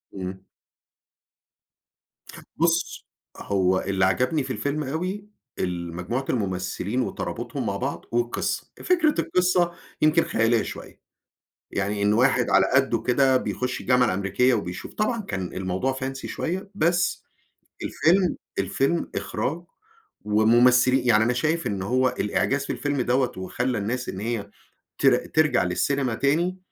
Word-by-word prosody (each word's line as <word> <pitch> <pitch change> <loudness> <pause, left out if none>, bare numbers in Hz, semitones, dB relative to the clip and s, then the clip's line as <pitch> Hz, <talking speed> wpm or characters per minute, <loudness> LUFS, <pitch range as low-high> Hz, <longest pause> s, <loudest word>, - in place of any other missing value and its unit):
إمم. 95 0 -6 2.1
بُص، 165 0 0 0.3
هو 95 -2 +1
اللي 95 -1 +1
عجبني 125 - +1
في 130 0 -4
الفيلم 145 +2 -2
أوي، 180 +9 -4 0.3
المجموعة 90 +8 -3
الممثّلين 100 +2 -1
وترابُطهم - - -4
مع - - -1
بعض - - -4
والقِصّة. 120 0 -1
فكرة 330 -5 +2
القِصّة 180 -1 +2 0.3
يمكن 155 +2 +4
خياليّة 115 0 +2
شوية. - - -9 0.7
يعني 100 +1 -2
إن 105 +1 +3
واحد 125 +2 +3
على - - +5
قَدُّه 135 0 +2
كده 130 +1 +3
بيخُش 125 0 -2
الجامعة 125 -1 +3
الأمريكية 100 +6 +2
وبيشوف. 90 -5 -5
طبعًا 220 +1 0
كان 95 - -4
الموضوع 95 +8 -1
fancy 135 0 -5
شوية، 190 +4 -4
بس 175 -1 +1 0.6
الفيلم 180 +2 +2 0.2
الفيلم 165 +5 0
إخراج 165 +6 -3 0.6
ومُمثِّلي 125 +4 +4
يعني 110 -2 +5
أنا 120 - +2
شايف 160 +7 0
إن 100 -2 -3
هو 130 +6 +2
الإعجاز 135 +6 0
في - - -2
الفيلم 145 -3 -1
دوّة 125 +1 +1
وخلّى 120 +7 -2
الناس 120 +5 -2
إن 95 - -5
هي 105 -2 -3 0.5
تر - - +5
ترجع 155 -10 +2
للسينما 125 +8 0
تاني، 165 +9 +1
125 Hz, 125 wpm, -24 LUFS, 100-150 Hz, 2.1 s, على